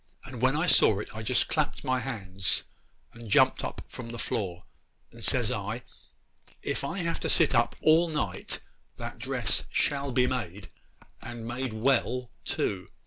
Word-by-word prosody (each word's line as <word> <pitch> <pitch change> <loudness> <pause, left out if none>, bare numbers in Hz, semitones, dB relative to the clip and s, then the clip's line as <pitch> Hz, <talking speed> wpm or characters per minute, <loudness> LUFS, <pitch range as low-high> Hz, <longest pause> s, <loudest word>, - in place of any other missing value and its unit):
And 125 -3 -8
when 130 +2 +3
I 155 +4 +1
saw 110 - +6
it 105 +4 -6
I 110 - -4
just 120 +3 +2
clapped 150 -2 -1
my 130 0 +1
hands 95 -8 0 0.5
and 115 -1 -10
jumped - - +4
up - - -5
from 120 -2 -7
the 120 - -6
floor; 90 -7 -3 0.5
and - - -13
says - - +3
I, - - -3 0.8
"If - - -2
I 165 +7 -3
have 170 0 -1
to - - -2
sit 160 -5 +4
up 120 -1 +2
all 165 +2 +5
night 100 - -3 0.4
that - - -7
dress - - +1
shall 140 -1 0
be 125 0 +3
made, 100 -8 -4 0.5
and 120 -1 -7
made 125 0 -3
well 125 +1 +1
too." 95 -3 -1
120 Hz, 165 wpm, -28 LUFS, 105-135 Hz, 0.8 s, saw